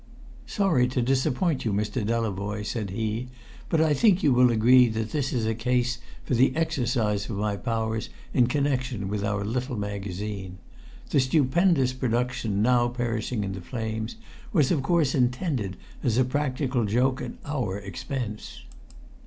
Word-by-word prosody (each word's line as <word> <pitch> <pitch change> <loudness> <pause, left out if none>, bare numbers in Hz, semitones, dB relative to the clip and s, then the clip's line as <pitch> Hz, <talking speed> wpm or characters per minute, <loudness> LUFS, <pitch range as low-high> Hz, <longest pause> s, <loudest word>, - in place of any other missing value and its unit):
"Sorry 175 - +2
to 125 0 -1
disappoint 135 +5 +1
you, 110 - 0
Mr. 105 +3 -1
Delavoye," 105 -2 -2
said 105 -2 -3
he; 110 +4 -2 0.4
"but 165 - +2
I 160 -1 +4
think 190 - +3
you 140 - +5
will 125 0 +5
agree 120 +2 +6
that 110 -1 -3
this 145 -4 -1
is 120 -3 0
a 110 - +1
case 125 +2 0 0.2
for - - -2
the 125 +2 +3
exercise 120 -9 0
of 105 - -3
my 105 0 0
powers 110 0 -2 0.2
in 125 -2 +4
connection 130 -6 -1
with 100 0 -2
our 105 -1 -1
little 125 +3 -2
magazine. 100 -1 -5 0.5
The 140 - +4
stupendous 135 +1 +3
production 120 -4 -1
now 120 0 +4
perishing 120 -2 -2
in 100 - -3
the 95 -1 -6
flames 110 +1 -4 0.4
was 155 - +3
of 155 -6 +2
course 155 -1 +2
intended 125 - 0 0.2
as 120 -3 +1
a 130 - +4
practical 130 -2 0
joke 125 +5 +1
at 125 - -5
our 125 -10 -2
expense." 115 +2 -6
120 Hz, 155 wpm, -26 LUFS, 105-130 Hz, 0.5 s, agree